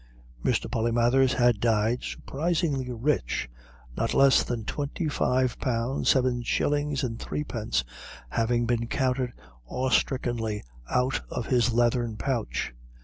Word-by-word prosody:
Mr. - - +1
Polymathers 120 +3 +2
had 120 -3 +3
died 115 +1 +2
surprisingly 150 -4 -1
rich, 120 - 0 0.5
not 115 - -1
less 135 -1 +6
than 115 -3 -3
twenty 150 +3 -3
five 130 -4 +1
pounds, 125 +1 0
seven 125 -2 +3
shillings 145 +3 0
and 115 -3 -3
threepence 115 - -2 0.5
having 120 - +1
been 115 0 0
counted 130 -1 0 0.4
awestrickenly 120 -4 0 0.3
out 125 +1 +1
of - - -3
his 125 -1 +2
leathern 120 -1 +1
pouch. 120 - -2
125 Hz, 115 wpm, -27 LUFS, 115-135 Hz, 0.5 s, less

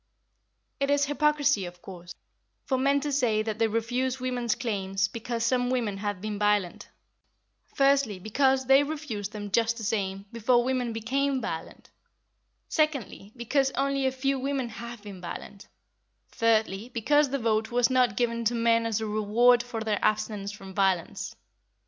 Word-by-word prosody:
It 275 0 0
is 285 0 +3
hypocrisy, 290 -4 +2
of 175 0 -11
course, 175 -2 -10 0.5
for 265 - 0
men 280 +1 +2
to 295 0 -2
say 235 -6 +2
that 215 0 -4
they 225 - +3
refuse 245 +4 -1
women's 245 -3 -1
claims 195 -5 -1
because 230 +1 -3
some 245 0 +1
women 230 -6 -1
have 205 -2 -3
been 210 -1 -4
violent, 205 -4 0 0.9
firstly, 275 -7 +3
because 265 +7 +1
they 270 +2 +6
refused 285 -9 -4
them 205 -2 -7
just 230 +2 +2
the 225 - -6
same, 195 -2 -2
before 240 +1 +2
women 250 -2 -1
became 265 +5 0
violent; 165 -8 -6 0.8
secondly, 275 - -1
because 265 +3 +1
only 275 0 +1
a - - +1
few 270 +1 -1
women 270 -2 -2
have 235 -1 -8
been 200 -3 -9
violent; 190 +3 -8 0.6
thirdly, 220 -1 +1
because 285 +5 +2
the 275 - -1
vote 225 -3 0
was 245 +1 +2
not 250 -5 +2
given 235 -1 0
to 240 +2 +2
men 230 0 +2
as 225 -1 -1
a - - -2
reward 215 +3 +3
for 240 -2 -6
their 215 -2 -1
abstinence 210 -1 0
from 195 -2 -10
violence. 190 +1 0
230 Hz, 160 wpm, -27 LUFS, 210-260 Hz, 0.9 s, they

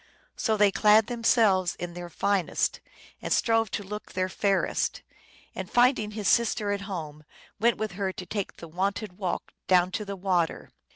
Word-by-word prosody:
So 220 -2 0
they 205 -1 +5
clad 215 +2 +5
themselves 225 -6 +2
in 175 -1 -6
their 175 0 -7
finest 195 +1 0 0.4
and - - -5
strove 225 -2 +2
to 205 - -3
look 210 +2 -8
their 185 0 -1
fairest; 195 +1 0 0.5
and - - -6
finding 245 -3 +3
his 210 -2 -4
sister 220 -3 +2
at 200 0 -2
home 155 -5 -6 0.4
went 235 +2 +3
with 215 -1 -3
her 190 +1 -2
to 185 - -8
take 200 +1 -4
the 165 - -9
wonted 190 +3 -3
walk 185 -3 -3
down 180 0 +4
to 210 - -3
the 200 -1 -5
water. 180 -3 -1
200 Hz, 170 wpm, -27 LUFS, 185-215 Hz, 0.5 s, they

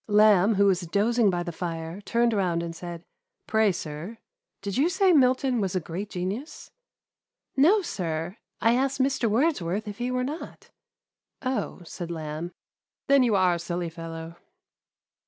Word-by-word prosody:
Lamb, 210 -1 +5
who 200 +1 +4
was 190 -2 +3
dozing 210 +5 +2
by 175 -2 -1
the 175 - -4
fire, 165 +2 -5
turned 235 +2 +1
round 180 -5 0
and 165 -1 -5
said, 170 0 -7 0.2
" - - -59
Pray, 220 -2 +3
sir, 170 +6 -6 0.5
did 200 -1 -3
you 285 +7 +3
say 375 0 +3
Milton 255 -3 +3
was 190 -2 -1
a - - +2
great 180 +5 -6
genius 200 - -5 0.3
?" - - -66
" - - -57
No, 370 +10 +5
sir, 170 - -3 0.2
I 230 - +4
asked 270 +2 0
Mr. 265 -3 +2
Wordsworth 210 - 0
if 205 +1 -7
he 245 +1 -1
were 250 0 0
not. 295 +6 -7 0.7
Oh,'* 255 -7 -2
said 170 0 -7
Lamb, 160 0 -4
*• - - -26 0.5
then 280 -1 +5
you 235 -4 +3
are 185 -2 +4
a 170 - -2
silly 170 0 -3
fellow.' 165 0 -8
200 Hz, 175 wpm, -26 LUFS, 170-245 Hz, 0.7 s, Lamb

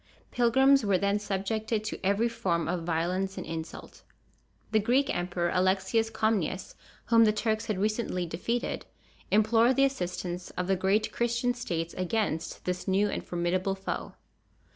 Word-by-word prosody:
Pilgrims 265 +3 +4
were 200 -3 +3
then 200 +2 +1
subjected 210 +2 -2
to 215 - -5
every 200 +4 +2
form 175 -7 -1
of 180 - -1
violence 175 +4 -1
and 185 - -5
insult. 165 0 -7 0.7
The 220 - +4
Greek 250 +6 +2
emperor 175 0 -1
Alexius 190 +5 +2
Comnenus, 205 -5 -1 0.3
whom 230 -1 +5
the 215 - +4
Turks 220 +1 -1
had 215 - -1
recently 210 -3 -1
defeated, 230 +9 -3 0.4
implored 225 +4 +4
the 275 - +5
assistance 180 -7 -3
of 180 - 0
the 190 +1 +2
great 195 +4 +1
Christian 240 +1 0
states 170 -9 -3
against 185 -3 -2
this 180 0 -3
new 195 +2 +2
and - - -3
formidable 180 +2 -1
foe. 190 - -5
200 Hz, 145 wpm, -29 LUFS, 180-225 Hz, 0.7 s, whom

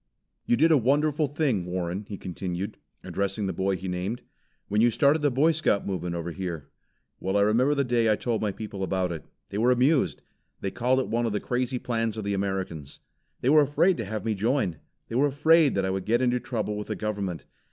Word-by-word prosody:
"You 120 - +3
did 160 +5 +4
a 155 - +6
wonderful 150 +4 +2
thing, 135 - 0
Warren," 90 +2 -3
he 100 - -5
continued, 90 +1 -5 0.3
addressing 100 +1 -2
the 95 - -2
boy 95 +2 0
he 95 +1 -6
named, 90 +6 -3 0.4
"when 105 +2 +1
you 120 - +6
started 140 +6 +3
the 145 - +3
Boy 140 +6 +3
Scout 155 -10 +1
movement 90 -3 -3
over 85 0 -4
here. 85 -4 -5 0.5
Well 95 +2 0
I - - +4
remember 120 +8 +3
the 140 - +2
day 120 -3 +2
I - - +4
told 115 0 -2
my 105 -2 0
people 105 -1 -7
about 95 -1 0
it. 80 -3 -6 0.3
They 100 - -2
were 120 +3 +3
amused. 130 +4 +2 0.4
They 95 - -3
called 125 +4 +1
it 130 - -1
one 120 +1 0
of 110 - -2
the 105 - 0
crazy 125 +3 -1
plans 115 -2 -2
of 110 - -3
the 100 0 -1
Americans. 95 -7 -3 0.4
They 125 - +2
were 155 +1 +7
afraid 150 +6 +3
to 115 - -3
have 110 +2 -4
me 110 - +1
join. 105 - 0 0.3
They - - -9
were 135 +5 +3
afraid 155 +2 +4
that 95 -1 +1
I 95 - 0
would 95 -1 -3
get 115 +2 +2
into 125 -1 +2
trouble 110 -4 -3
with 105 - -5
the - - -3
government. 100 -5 -3
110 Hz, 225 wpm, -26 LUFS, 95-130 Hz, 0.5 s, were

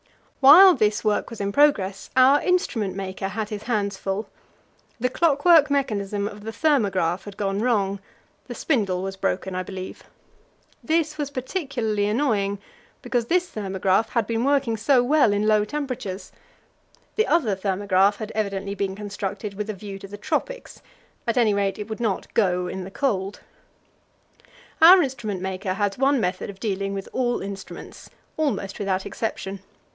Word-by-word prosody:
While 350 +8 +9
this 215 -4 +1
work 210 -1 0
was 230 - -9
in 200 0 -1
progress, 200 -9 +2
our 260 +3 +6
instrument 245 - 0
maker 190 0 -4
had 215 +1 -4
his 210 -2 -5
hands 205 -4 -1
full; 195 +3 -3 0.7
the 250 +2 +1
clockwork 325 +1 +4
mechanism 205 -7 -1
of 205 0 -9
the 225 - -5
thermograph 200 - +1
had 205 -1 -10
gone 195 -1 -1
wrong: 200 -4 0 0.5
the - - -7
spindle 195 - 0
was 195 0 -4
broken, 190 0 -2
I 185 - -2
believe. 185 0 -8 0.8
This 315 -1 0
was 290 -2 -2
particularly 255 - -2
annoying, 210 -4 0 0.5
because 240 -2 -1
this 360 +3 +1
thermograph 195 +1 0
had 235 -3 0
been 230 +1 -1
working 275 -4 +1
so 245 +3 +3
well 275 -3 +4
in 205 +1 0
low 215 -1 +4
temperatures. 240 -6 -5 0.8
The 435 - +2
other 255 - +2
thermograph 195 +1 +1
had 215 0 -7
evidently 200 -2 -2
been 195 -1 -3
constructed 200 0 -5
with 210 +2 -5
a 215 - -3
view 195 0 -8
to 195 - -9
the 205 +1 -9
tropics; - - -4 0.5
at 230 - 0
any 225 -4 +4
rate, 200 -1 0
it 210 -1 -6
would 220 0 -6
not 220 -5 -2
go 180 -4 +1
in 185 +1 -5
the 185 - -8
cold. 200 -4 -2 1.4
Our 355 +2 +9
instrument 240 -8 -4
maker 190 0 -3
has 205 +1 -1
one 275 0 +3
method 185 -2 -2
of 195 -1 -10
dealing 195 -2 -2
with 195 - -5
all 245 -4 0
instruments 195 -1 -9 0.3
almost 205 -11 -2
without 190 -2 -1
exception. 195 -3 -4
210 Hz, 160 wpm, -24 LUFS, 195-255 Hz, 1.4 s, While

